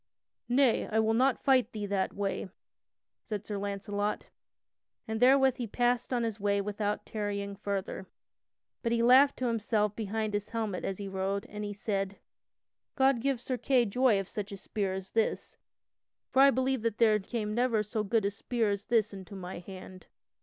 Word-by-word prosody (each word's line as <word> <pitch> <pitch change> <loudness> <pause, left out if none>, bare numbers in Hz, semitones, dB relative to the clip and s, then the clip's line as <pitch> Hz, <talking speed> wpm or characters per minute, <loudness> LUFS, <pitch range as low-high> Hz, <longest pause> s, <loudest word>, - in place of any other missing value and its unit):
"Nay, 250 -1 +3
I 220 - +1
will 220 0 +3
not 255 +2 +2
fight 260 -4 +3
thee 210 -2 -3
that 200 -1 0
way," 195 -1 -3 0.7
said 210 -2 -5
Sir 205 -2 -4
Launcelot, 205 +1 -3 0.8
and 220 0 -2
therewith 265 +1 +5
he 240 - -3
passed 245 +3 0
on 245 -2 +1
his 225 -2 -3
way 200 0 +1
without 205 +1 -2
tarrying 200 -2 -3
further. 195 -1 -4 0.7
But 230 -1 0
he 230 0 +2
laughed 260 +4 +6
to 255 - -2
himself 215 -3 0
behind 215 0 -2
his 205 0 -2
helmet 220 -5 -3
as 195 - -2
he 200 - -5
rode, 195 +1 -2
and 210 0 -6
he 205 0 -4
said: 195 -1 -2 0.8
"God 265 -3 +3
give 270 -1 0
Sir 255 +1 -3
Kay 255 -3 +3
joy 230 0 +3
of 195 - -4
such 205 0 -5
a 200 - -6
spear 195 0 -2
as 190 0 -7
this, 225 -1 -1 0.7
for 265 - +5
I 275 - +8
believe 260 -1 +1 0.2
there 215 -2 +4
came 210 +1 -3
never 235 -2 +2
so 215 +1 -2
good 215 0 +1
a 200 - +1
spear 225 +1 -1
as 200 0 -4
this 220 -3 +2
into 195 +1 -9
my 180 -1 -6
hand. 185 0 -11
210 Hz, 180 wpm, -30 LUFS, 200-240 Hz, 0.8 s, I